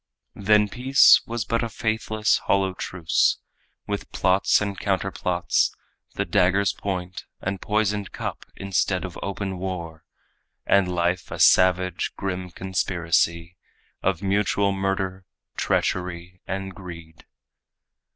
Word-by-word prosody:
Then 105 Hz, +1 st, +3 dB
peace 130 Hz, +6 st, +6 dB
was 115 Hz, -2 st, -3 dB
but 115 Hz, +2 st, 0 dB
a 115 Hz, -, -2 dB
faithless, 110 Hz, -1 st, 0 dB
hollow 95 Hz, -1 st, +1 dB
truce, 90 Hz, -3 st, +1 dB, 0.5 s
With -, -, -4 dB
plots 95 Hz, +1 st, +3 dB
and 100 Hz, -1 st, -2 dB
counter 95 Hz, -1 st, -1 dB
plots; 90 Hz, -2 st, 0 dB, 0.4 s
the -, -, -1 dB
dagger's 95 Hz, +2 st, +2 dB
point 90 Hz, -2 st, -5 dB
And 100 Hz, 0 st, -4 dB
poisoned 105 Hz, -1 st, 0 dB
cup -, -, -6 dB
instead 95 Hz, -1 st, -1 dB
of 90 Hz, -, -8 dB
open 95 Hz, -1 st, -4 dB
war; 85 Hz, -4 st, -5 dB, 0.6 s
And 100 Hz, -2 st, +4 dB
life 90 Hz, 0 st, -1 dB
a -, -, -6 dB
savage, 90 Hz, -1 st, +3 dB
grim 90 Hz, -1 st, -4 dB
conspiracy 85 Hz, -2 st, -1 dB, 0.4 s
Of 95 Hz, -1 st, -1 dB
mutual 100 Hz, 0 st, +1 dB
murder, 95 Hz, -1 st, -2 dB, 0.3 s
treachery 90 Hz, 0 st, -2 dB
and 95 Hz, 0 st, -4 dB
greed. 85 Hz, -4 st, -11 dB
95 Hz, 115 wpm, -24 LUFS, 90-100 Hz, 0.6 s, peace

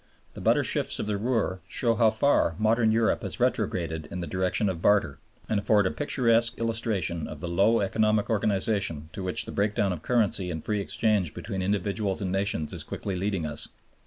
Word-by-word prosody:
The -, -, -9 dB
butter -, -, +3 dB
shifts -, -, +1 dB
of -, -, -2 dB
the 105 Hz, -1 st, -1 dB
Ruhr 110 Hz, -3 st, -1 dB
show 115 Hz, +4 st, +1 dB
how 115 Hz, 0 st, +4 dB
far 110 Hz, -, +2 dB
modern 110 Hz, +1 st, +3 dB
Europe 115 Hz, 0 st, +2 dB
has -, -, -4 dB
retrograded 80 Hz, -3 st, -1 dB
in 90 Hz, -, -5 dB
the 85 Hz, -, -3 dB
direction 95 Hz, +4 st, 0 dB
of 90 Hz, -4 st, -3 dB
barter, 100 Hz, -10 st, +2 dB, 0.3 s
and 110 Hz, -, +1 dB
afford 105 Hz, 0 st, +3 dB
a 95 Hz, -, +1 dB
picturesque 115 Hz, -5 st, +1 dB
illustration 110 Hz, -8 st, -1 dB
of 75 Hz, -, -8 dB
the 85 Hz, -, -5 dB
low 100 Hz, +7 st, +3 dB
economic 110 Hz, +1 st, +1 dB
organization 100 Hz, -6 st, 0 dB
to 100 Hz, -, -6 dB
which 95 Hz, -1 st, +2 dB
the -, -, -7 dB
breakdown 100 Hz, -1 st, 0 dB
of 80 Hz, -, -7 dB
currency 110 Hz, -5 st, +1 dB
and 80 Hz, -3 st, -5 dB
free 105 Hz, -2 st, -1 dB
exchange 100 Hz, -6 st, 0 dB
between 95 Hz, -3 st, -4 dB
individuals 100 Hz, +1 st, -1 dB
and 95 Hz, -3 st, -2 dB
nations 95 Hz, -5 st, -1 dB
is -, -, -3 dB
quickly 100 Hz, -, -5 dB
leading 95 Hz, -2 st, -1 dB
us. 75 Hz, 0 st, -2 dB
100 Hz, 190 wpm, -27 LUFS, 90-110 Hz, 0.3 s, how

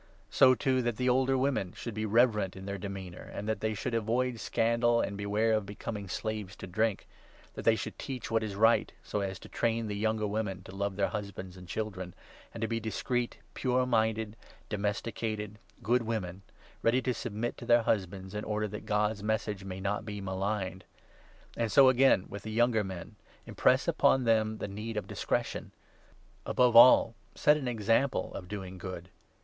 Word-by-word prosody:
So, 130 Hz, -1 st, +6 dB
too, 130 Hz, 0 st, +1 dB
that 120 Hz, -2 st, -1 dB
the 125 Hz, -, 0 dB
older 130 Hz, +1 st, +3 dB
women 130 Hz, -9 st, 0 dB
should 115 Hz, -, -6 dB
3 110 Hz, -, -4 dB
be -, -, 0 dB
reverent 105 Hz, -3 st, +3 dB
in 95 Hz, 0 st, -9 dB
their 100 Hz, 0 st, -4 dB
demeanour, 95 Hz, -2 st, -6 dB
and 105 Hz, -, -5 dB
that 110 Hz, -, -1 dB
they 110 Hz, 0 st, -1 dB
should 120 Hz, +5 st, -3 dB
avoid 115 Hz, +2 st, 0 dB
scandal, 115 Hz, +1 st, +2 dB
and 100 Hz, -, -1 dB
beware 105 Hz, +3 st, +1 dB
of 110 Hz, -1 st, +1 dB
becoming 105 Hz, 0 st, -6 dB
slaves 105 Hz, 0 st, -4 dB
to -, -, -8 dB
drink; 105 Hz, +3 st, -1 dB, 0.5 s
that -, -, -7 dB
they 115 Hz, -, +6 dB
4 -, -, -5 dB
should -, -, -6 dB
teach 130 Hz, -5 st, -5 dB
what 115 Hz, 0 st, +2 dB
is 105 Hz, -3 st, -4 dB
right, 110 Hz, +3 st, +4 dB
so 105 Hz, -, -2 dB
as 95 Hz, -1 st, -3 dB
to -, -, -12 dB
train 115 Hz, -1 st, 0 dB
the 105 Hz, -1 st, -3 dB
younger 110 Hz, +1 st, 0 dB
women 100 Hz, -3 st, -2 dB
to 95 Hz, -, -11 dB
love 100 Hz, 0 st, -2 dB
their 100 Hz, 0 st, +1 dB
husbands 100 Hz, -3 st, -6 dB
and 90 Hz, -1 st, -12 dB
children, 95 Hz, -4 st, -4 dB, 0.4 s
and 115 Hz, -, -8 dB
to 115 Hz, -, +1 dB
be 115 Hz, +1 st, -1 dB
discreet, 120 Hz, +3 st, -2 dB, 0.2 s
pure 130 Hz, 0 st, +1 dB
5 125 Hz, -, -1 dB
minded, 110 Hz, -2 st, +1 dB, 0.3 s
domesticated, 105 Hz, 0 st, -3 dB, 0.2 s
good 120 Hz, +4 st, +3 dB
women, 100 Hz, -5 st, -3 dB, 0.4 s
ready 115 Hz, +3 st, +3 dB
to 125 Hz, -, +1 dB
submit 110 Hz, +1 st, -3 dB
to -, -, -8 dB
their 120 Hz, -1 st, +5 dB
husbands, 95 Hz, -2 st, -1 dB
in 105 Hz, 0 st, -3 dB
order 105 Hz, 0 st, -1 dB
that 105 Hz, +1 st, -8 dB
God's 105 Hz, -1 st, +1 dB
Message 105 Hz, -2 st, -2 dB
may 95 Hz, -1 st, -6 dB
not 100 Hz, +2 st, -1 dB
be 105 Hz, -2 st, -6 dB
maligned. 95 Hz, -1 st, -3 dB, 0.7 s
And 115 Hz, -2 st, -1 dB
so 135 Hz, -2 st, +8 dB
again 130 Hz, -6 st, +4 dB
with 100 Hz, -, -7 dB
the 110 Hz, -, -7 dB
younger 115 Hz, -1 st, +3 dB
men— 95 Hz, +2 st, -7 dB, 0.3 s
impress -, -, +2 dB
upon 135 Hz, -, +3 dB
them 110 Hz, -2 st, +2 dB
the -, -, -4 dB
6 100 Hz, -, -7 dB
need 110 Hz, +2 st, -5 dB
of 105 Hz, -, -2 dB
discretion. -, -, -2 dB, 0.7 s
Above 125 Hz, -2 st, +3 dB
all, 115 Hz, -1 st, +8 dB, 0.2 s
set 150 Hz, -, +5 dB
an 145 Hz, -4 st, -3 dB
example 115 Hz, +3 st, +1 dB
of 90 Hz, -, -7 dB
doing 95 Hz, -2 st, -6 dB
good. 90 Hz, -1 st, -7 dB
110 Hz, 195 wpm, -30 LUFS, 100-115 Hz, 0.7 s, so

